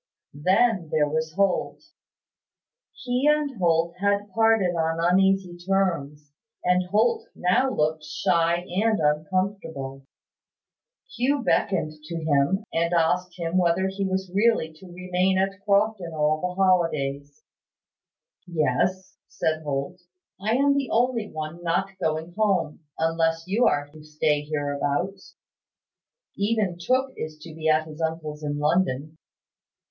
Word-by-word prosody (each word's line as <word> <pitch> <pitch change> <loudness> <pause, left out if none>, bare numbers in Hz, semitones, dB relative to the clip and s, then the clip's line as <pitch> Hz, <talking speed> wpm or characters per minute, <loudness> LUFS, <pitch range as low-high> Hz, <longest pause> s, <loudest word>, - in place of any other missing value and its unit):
Then 185 - +2
there 150 -1 +2
was 160 +1 -2
Holt. 195 -2 0 1.1
He 250 +2 -1
and 300 -3 0
Holt 170 -1 +2
had 200 0 0
parted 225 -5 +3
on 165 0 0
uneasy 190 +1 +2
terms; 165 -7 -1 0.3
and 180 0 +2
Holt 225 +4 +2
now 180 +9 +2
looked 155 -7 0
shy 170 +3 +1
and 215 +3 +1
uncomfortable. 150 -3 -2 1.1
Hugh 270 +2 +1
beckoned 185 -10 +1
to 170 - -6
him, 160 +4 +1
and 170 +1 +1
asked 175 +2 +1
him 170 +1 -1
whether 180 +1 +2
he 195 +1 -3
was 190 -1 -2
really 200 -6 +2
to 180 +1 -13
remain 185 +1 0
at 195 +1 -1
Crofton 200 -4 +1
all 155 0 +1
the 180 0 -3
holidays. 150 -4 0 1.0
"Yes," 175 +4 -1
said 155 0 -1
Holt. 145 +4 -4 0.4
"I 220 +3 +1
am 280 +2 +3
the 275 -2 -1
only 235 -2 +1
one 155 +2 -6
not 175 +3 0
going 160 +2 -2
home, 195 -8 +1 0.2
unless 165 0 +1
you 215 +6 +3
are 145 0 +1
to 155 +1 -14
stay 150 -1 0
hereabouts. 145 +5 -2 1.0
Even 200 -4 0
Tooke 260 +8 0
is 155 0 -6
to 165 - -10
be 160 0 -1
at 155 0 +3
his 155 +1 -10
uncle's 160 -2 -3
in 145 0 -2
London. 155 -1 0
175 Hz, 130 wpm, -25 LUFS, 155-195 Hz, 1.1 s, parted